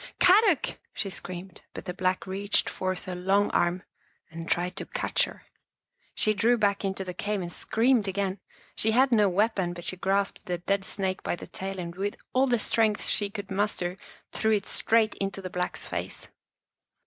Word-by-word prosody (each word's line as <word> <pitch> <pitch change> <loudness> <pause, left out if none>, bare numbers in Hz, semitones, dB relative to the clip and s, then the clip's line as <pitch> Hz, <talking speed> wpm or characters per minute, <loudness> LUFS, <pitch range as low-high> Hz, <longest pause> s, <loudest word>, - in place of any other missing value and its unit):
" - - -45
Kadok!" 380 - +5 0.2
she 195 - -2
screamed, 180 0 -6
but - - -7
the 180 - -3
Black 185 0 0
reached 195 +2 +1
forth 185 0 -3
a 185 - -3
long 195 +3 +2
arm 175 +1 +1 0.5
and 165 0 -7
tried 180 +1 0
to - - -4
catch - - +1
her. - - -11 0.7
She 215 - +3
drew 230 +4 +3
back 200 -2 +1
into 195 0 -2
the 180 - -5
cave 205 +3 -2
and 175 -2 -5
screamed 230 -2 +2
again. 195 0 -1 0.4
She 220 0 +2
had 260 +3 +4
no 210 -4 +5
weapon, 190 -2 +1
but 175 0 -8
she 185 - -3
grasped 195 +2 0
the 180 -1 -1
dead 195 +3 -1
snake 190 -1 -2
by - - -1
the - - -9
tail 195 0 -5
and 170 -2 -5
with 200 +2 -2 0.2
all 260 +1 +4
the 245 -2 +3
strength 215 -1 +1
she 205 -1 +3
could 200 -1 -7
muster 190 -3 0 0.4
threw 220 0 +1
it 200 -2 +1
straight 225 -1 +2
into 195 0 -2
the 185 -2 -6
Black's 180 0 -2
face. - - -5
195 Hz, 190 wpm, -28 LUFS, 185-215 Hz, 0.7 s, Kadok